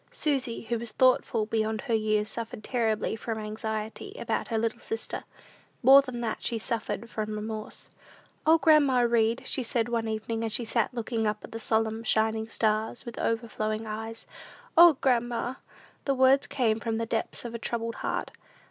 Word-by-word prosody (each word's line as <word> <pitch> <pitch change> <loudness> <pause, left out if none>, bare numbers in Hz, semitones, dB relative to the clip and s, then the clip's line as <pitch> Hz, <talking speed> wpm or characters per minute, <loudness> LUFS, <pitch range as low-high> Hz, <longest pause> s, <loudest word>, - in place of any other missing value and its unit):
Susy, 270 -6 -1
who 230 0 -2
was 235 -1 -4
thoughtful 250 -3 +3
beyond 220 0 -1
her 240 - -2
years, 215 -1 +1
suffered 225 -2 -6
terribly 225 -3 0
from 225 0 -4
anxiety 220 - -5
about - - -2
her 225 - -1
little 225 0 -1
sister. 450 - -4 0.6
More 270 +3 +9
than 255 -3 -6
that, 225 -2 -2
she 235 - -1
suffered 230 0 -3
from 215 -1 -4
remorse. 215 0 -6 0.5
"O, 320 +1 +6
grandma 290 -4 +5
Read," 235 +1 +2
said 235 -3 0
she - - -8
one 230 -1 0
evening, 220 +1 -2
as 225 - -2
she 240 - -1
sat 230 0 0
looking 230 -2 -2
up 210 0 -2
at - - -10
the 225 - -5
solemn, 220 0 0
shining 220 0 +1
stars, 220 +1 0
with 235 -2 -7
overflowing 225 -1 -1
eyes 220 +1 -6 0.5
"O, 340 0 +9
grandma!" 240 -1 +1 0.5
The 275 - +1
words 265 +2 +4
came 225 -4 +1
from 225 -1 -2
the 230 - -1
depths 225 +1 -2
of 235 - -5
a 235 - -4
troubled 230 0 -3
heart. - - -2
225 Hz, 175 wpm, -28 LUFS, 220-240 Hz, 0.6 s, More